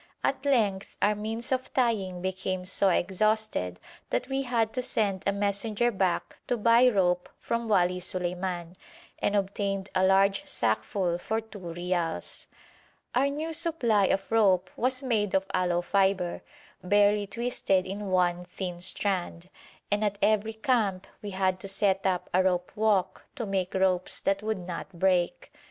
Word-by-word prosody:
At -, -, -1 dB
length 210 Hz, -8 st, +1 dB
our 210 Hz, -, +3 dB
means 220 Hz, +4 st, -4 dB
of 260 Hz, 0 st, -1 dB
tying 195 Hz, -8 st, 0 dB
became 185 Hz, 0 st, -2 dB
so 195 Hz, +1 st, +1 dB
exhausted 190 Hz, -, 0 dB, 0.3 s
that -, -, -1 dB
we 270 Hz, 0 st, 0 dB
had 235 Hz, -4 st, 0 dB
to 255 Hz, -, -1 dB
send 200 Hz, -6 st, 0 dB
a -, -, +4 dB
messenger 205 Hz, +3 st, 0 dB
back 190 Hz, -4 st, -1 dB
to 245 Hz, -, 0 dB
buy 235 Hz, +3 st, +5 dB
rope 180 Hz, -5 st, +1 dB
from 235 Hz, 0 st, -2 dB
Wali 180 Hz, -3 st, +2 dB
Suleiman, 180 Hz, -1 st, -3 dB, 0.4 s
and 205 Hz, -, 0 dB
obtained 195 Hz, 0 st, -1 dB
a 185 Hz, -, +2 dB
large 195 Hz, +1 st, +3 dB
sackful 170 Hz, -, -1 dB
for 220 Hz, +4 st, -1 dB
two 220 Hz, -2 st, -11 dB
reals. 175 Hz, -1 st, -3 dB, 0.7 s
Our 260 Hz, +3 st, +3 dB
new 310 Hz, +3 st, -4 dB
supply 285 Hz, -12 st, +3 dB
of 195 Hz, +2 st, -1 dB
rope 190 Hz, -5 st, +3 dB
was 255 Hz, +2 st, 0 dB
made 215 Hz, -6 st, 0 dB
of 190 Hz, 0 st, +2 dB
aloe 175 Hz, -1 st, +1 dB
fibre, 190 Hz, -2 st, +1 dB, 0.4 s
barely 205 Hz, +2 st, +3 dB
twisted 200 Hz, -4 st, 0 dB
in 200 Hz, +2 st, -5 dB
one 180 Hz, -1 st, +1 dB
thin 180 Hz, -1 st, -6 dB
strand, 180 Hz, -2 st, 0 dB, 0.4 s
and 205 Hz, +1 st, +1 dB
at 205 Hz, -1 st, 0 dB
every 215 Hz, +1 st, +2 dB
camp 220 Hz, -6 st, 0 dB, 0.2 s
we 205 Hz, -, -6 dB
had 190 Hz, -1 st, 0 dB
to 195 Hz, -, -4 dB
set 195 Hz, 0 st, +2 dB
up 180 Hz, -2 st, -1 dB
a 185 Hz, -, +4 dB
rope 180 Hz, -1 st, 0 dB
walk 200 Hz, -4 st, 0 dB
to 235 Hz, -, -3 dB
make 190 Hz, -2 st, -2 dB
ropes 185 Hz, -1 st, +2 dB
that 195 Hz, 0 st, 0 dB
would 215 Hz, 0 st, -2 dB
not 175 Hz, +2 st, -6 dB
break. 185 Hz, +5 st, 0 dB
195 Hz, 155 wpm, -28 LUFS, 185-220 Hz, 0.7 s, buy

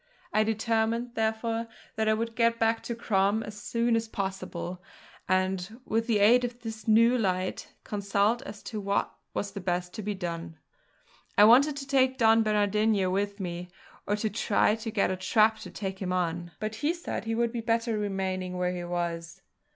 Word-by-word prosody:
I 215 Hz, -, +4 dB
determined, 225 Hz, +2 st, 0 dB
therefore, 225 Hz, 0 st, -1 dB, 0.3 s
that 220 Hz, 0 st, +1 dB
I 215 Hz, -, +4 dB
would 230 Hz, +1 st, -3 dB
get 230 Hz, 0 st, +3 dB
back 225 Hz, 0 st, +2 dB
to 235 Hz, -, -3 dB
Crom 210 Hz, -1 st, +1 dB
as 210 Hz, -, -8 dB
soon 235 Hz, 0 st, +1 dB
as 225 Hz, 0 st, 0 dB
possible, 190 Hz, -4 st, -4 dB, 0.5 s
and, 185 Hz, +3 st, 0 dB
with 225 Hz, +1 st, 0 dB
the 225 Hz, -3 st, +3 dB
aid 230 Hz, +5 st, +5 dB
of 245 Hz, 0 st, -4 dB
this 220 Hz, -2 st, -7 dB
new 230 Hz, +3 st, +5 dB
light, 185 Hz, -3 st, -1 dB
consult 205 Hz, +3 st, +1 dB
as 220 Hz, -7 st, -9 dB
to 215 Hz, -2 st, -5 dB
what 200 Hz, 0 st, 0 dB, 0.2 s
was 200 Hz, -, -2 dB
best 180 Hz, -2 st, -2 dB
to 220 Hz, -, -5 dB
be 205 Hz, 0 st, -3 dB
done. 170 Hz, -3 st, -5 dB, 0.8 s
I -, -, +8 dB
wanted 275 Hz, +7 st, +6 dB
to 275 Hz, -1 st, -6 dB
take 260 Hz, -1 st, +3 dB
Don 225 Hz, -1 st, +5 dB
Bernardino 210 Hz, -2 st, +2 dB
with 200 Hz, +2 st, -1 dB
me, 175 Hz, -1 st, -5 dB, 0.4 s
or 205 Hz, -, +2 dB
to 215 Hz, +1 st, -1 dB
try 210 Hz, -1 st, +2 dB
to 225 Hz, +1 st, -4 dB
get 210 Hz, -3 st, +1 dB
a -, -, 0 dB
trap 215 Hz, +4 st, +3 dB
to -, -, -8 dB
take 195 Hz, -2 st, -5 dB
him 185 Hz, -1 st, -2 dB
on; 175 Hz, -1 st, -1 dB
but 215 Hz, 0 st, -3 dB
he 315 Hz, +4 st, +1 dB
said 340 Hz, -8 st, -5 dB
he 225 Hz, 0 st, -1 dB
would 235 Hz, 0 st, +1 dB
be 235 Hz, -1 st, -3 dB
better 230 Hz, 0 st, 0 dB
remaining 190 Hz, -2 st, -2 dB
where 180 Hz, 0 st, 0 dB
he 175 Hz, -, -4 dB
was. 170 Hz, -1 st, -4 dB
215 Hz, 185 wpm, -28 LUFS, 190-230 Hz, 0.8 s, I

